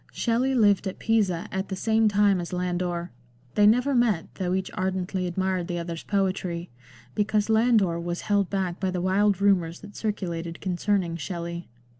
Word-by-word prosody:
Shelley 250 Hz, +3 st, +1 dB
lived 205 Hz, -4 st, +4 dB
at 190 Hz, -, -5 dB
Pisa 200 Hz, -7 st, +1 dB
at 190 Hz, +1 st, -3 dB
the 190 Hz, -, -2 dB
same 220 Hz, +3 st, +2 dB
time 205 Hz, -2 st, +3 dB
as 170 Hz, -, -6 dB
Landor; 180 Hz, -1 st, -2 dB, 0.4 s
they 205 Hz, 0 st, +5 dB
never 250 Hz, +6 st, +3 dB
met, 230 Hz, -9 st, +1 dB
though 185 Hz, -1 st, -1 dB
each 190 Hz, 0 st, -2 dB
ardently 185 Hz, 0 st, -2 dB
admired 185 Hz, 0 st, -1 dB
the 175 Hz, -2 st, -3 dB
other's 170 Hz, -1 st, -4 dB
poetry, 185 Hz, -3 st, -2 dB, 0.4 s
because 210 Hz, -, +1 dB
Landor 220 Hz, -7 st, +3 dB
was 175 Hz, +1 st, -3 dB
held 200 Hz, -2 st, +1 dB
back 190 Hz, -3 st, -2 dB
by 190 Hz, -, 0 dB
the 180 Hz, -1 st, -2 dB
wild 195 Hz, +2 st, +2 dB
rumours 180 Hz, -4 st, +2 dB
that 205 Hz, -1 st, -12 dB
circulated 170 Hz, -6 st, -3 dB
concerning 185 Hz, -2 st, 0 dB
Shelley. 170 Hz, +2 st, -5 dB
190 Hz, 165 wpm, -26 LUFS, 175-205 Hz, 0.4 s, they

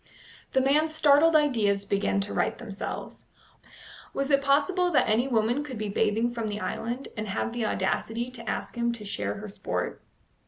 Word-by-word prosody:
The 265 Hz, -, +4 dB
man's 305 Hz, +4 st, +2 dB
startled 310 Hz, +2 st, +5 dB
ideas 220 Hz, -10 st, +2 dB
began 200 Hz, 0 st, +1 dB
to 200 Hz, -, -4 dB
right -, -, 0 dB
themselves. 200 Hz, -3 st, -6 dB, 0.9 s
Was 275 Hz, +1 st, -1 dB
it 275 Hz, 0 st, +5 dB
possible 300 Hz, +7 st, +2 dB
that 260 Hz, -7 st, +3 dB
any 230 Hz, +4 st, +2 dB
woman 240 Hz, +3 st, +1 dB
could 265 Hz, -5 st, -7 dB
be 215 Hz, -1 st, -3 dB
bathing 220 Hz, +3 st, +1 dB
from 230 Hz, -2 st, -3 dB
the 210 Hz, 0 st, -3 dB
island, 240 Hz, +5 st, -4 dB
and 215 Hz, 0 st, -4 dB
have 210 Hz, +4 st, -2 dB
the 235 Hz, -3 st, -1 dB
audacity 225 Hz, +6 st, -1 dB
to 230 Hz, -3 st, -6 dB
ask -, -, -4 dB
him 235 Hz, 0 st, +1 dB
to 220 Hz, -3 st, -8 dB
share 200 Hz, -, -2 dB
her 210 Hz, +1 st, -7 dB
sport? 200 Hz, -, -4 dB
235 Hz, 180 wpm, -27 LUFS, 215-275 Hz, 0.9 s, startled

